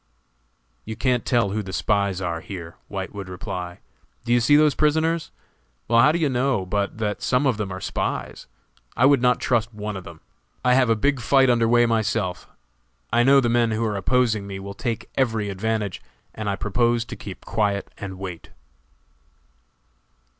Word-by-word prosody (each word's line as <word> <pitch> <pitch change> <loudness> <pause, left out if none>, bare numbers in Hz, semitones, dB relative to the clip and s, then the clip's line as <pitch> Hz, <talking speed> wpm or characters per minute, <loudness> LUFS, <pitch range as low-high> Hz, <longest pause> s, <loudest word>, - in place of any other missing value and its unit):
"You 110 - -6
can't 125 0 0
tell 115 -5 +2
who 105 +2 -1
the 95 -2 -7
spies 100 -1 0
are 85 -2 -3
here," 85 -4 -8
White 95 -2 -5
would 100 -2 -7
reply, 90 -1 -6 0.4
"do 120 - +1
you 120 - +5
see 120 +5 +4
those 150 -1 +5
prisoners? 160 +2 +1 0.6
well, 115 0 +4
how 135 +5 +6
do 165 - 0
you 160 -3 +1
know 125 -6 0
but 100 +2 -2
that 105 -2 -2
some 130 +2 +1
of 130 -5 +2
them 105 -3 -3
are 95 - -5
spies? 95 - -4 0.5
I 125 - +5
would 140 -2 +5
not 125 0 +3
trust 120 -2 0
one 105 0 -4
of 95 - -6
them. 85 -2 -12 0.4
I 125 - +5
have 130 -2 +4
a 115 - +4
big 140 +5 +1
fight 130 +2 +4
under 115 -1 +2
way 120 +1 +4
myself; 110 -5 -1 0.7
I 120 - +4
know 135 +3 +6
the 120 - +1
men 120 0 +2
who 110 +1 -1
are 105 -2 -1
opposing 110 0 +1
me 100 -1 -6
will 100 +1 -7
take 115 +2 -4
every 110 -6 0
advantage, 105 0 -2 0.3
and 110 -1 -4
I 100 - 0
propose 115 +3 +1
to 120 +1 -7
keep 100 -3 -10
quiet 100 -2 -1
and 95 -2 -6
wait." 90 -3 -7
110 Hz, 185 wpm, -23 LUFS, 100-125 Hz, 0.7 s, how